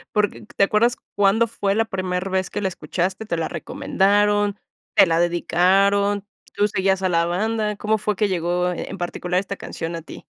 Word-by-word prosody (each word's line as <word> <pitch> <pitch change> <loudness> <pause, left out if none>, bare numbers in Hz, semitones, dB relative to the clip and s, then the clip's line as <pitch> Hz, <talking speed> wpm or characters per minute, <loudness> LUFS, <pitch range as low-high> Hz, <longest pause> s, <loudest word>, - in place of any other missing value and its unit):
Porque, 210 -1 0
¿te - - +3
acuerdas 230 +5 +3 0.2
cuándo 205 +3 +3
fue 200 -3 -1
la 225 +1 +2
primer 185 -2 -3
vez 190 -1 -1
que - - -4
la 195 - +1
escuchaste? 185 +4 -3
¿Te 170 -5 -2
la 165 - -1
recomendaron? 205 +4 +1 0.4
¿Te - - +8
la 165 -2 +1
dedicaron? 195 +4 +2 0.3
¿Tú 205 - +2
seguías 190 -1 +1
a 185 - +2
la 170 -1 +2
banda? 210 +4 -1
¿Cómo 215 +1 +1
fue 210 0 -1
que 210 +2 +1
llegó 180 -1 0
en 180 - -6
particular 180 0 -2
esta 200 +1 -5
canción 165 0 -5
a 165 - -5
ti? 165 - -11
195 Hz, 185 wpm, -22 LUFS, 180-205 Hz, 0.4 s, Te